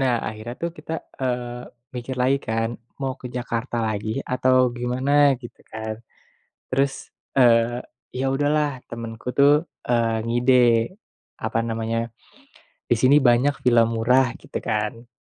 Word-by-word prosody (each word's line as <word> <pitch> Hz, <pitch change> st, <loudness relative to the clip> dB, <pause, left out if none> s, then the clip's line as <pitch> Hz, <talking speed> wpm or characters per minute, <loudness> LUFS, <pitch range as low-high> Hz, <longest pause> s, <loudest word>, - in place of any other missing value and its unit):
Nah 130 Hz, -2 st, +2 dB
akhirnya 110 Hz, +2 st, -5 dB
tuh 170 Hz, -, 0 dB
kita, 155 Hz, +2 st, -7 dB, 0.3 s
eee, 125 Hz, -1 st, -3 dB, 0.3 s
mikir 125 Hz, +1 st, -5 dB
lagi 130 Hz, +2 st, +2 dB
kan 115 Hz, 0 st, 0 dB, 0.3 s
mau 135 Hz, -1 st, -1 dB
ke -, -, -6 dB
Jakarta 120 Hz, 0 st, -3 dB
lagi 105 Hz, 0 st, -3 dB, 0.2 s
atau 130 Hz, -1 st, +3 dB
gimana 125 Hz, +3 st, -1 dB, 0.3 s
gitu 120 Hz, -1 st, -12 dB
kan, 110 Hz, 0 st, -5 dB, 0.8 s
terus, 135 Hz, +1 st, +2 dB, 0.4 s
eee, 120 Hz, -1 st, +4 dB, 0.3 s
ya 130 Hz, +1 st, -1 dB
udahlah 145 Hz, 0 st, +1 dB
temenku 115 Hz, 0 st, -8 dB
tuh, 140 Hz, +1 st, +6 dB, 0.3 s
eee, 115 Hz, -2 st, +1 dB
ngide, 120 Hz, +3 st, +2 dB, 0.9 s
apa 110 Hz, +1 st, 0 dB
namanya, 115 Hz, 0 st, -2 dB, 0.9 s
di 120 Hz, -, +6 dB
sini 130 Hz, +4 st, +5 dB
banyak 125 Hz, +4 st, +4 dB
villa 120 Hz, -2 st, +5 dB
murah 115 Hz, +3 st, +3 dB, 0.2 s
gitu -, -, -5 dB
kan. 105 Hz, +3 st, -2 dB
120 Hz, 130 wpm, -23 LUFS, 115-130 Hz, 0.9 s, tuh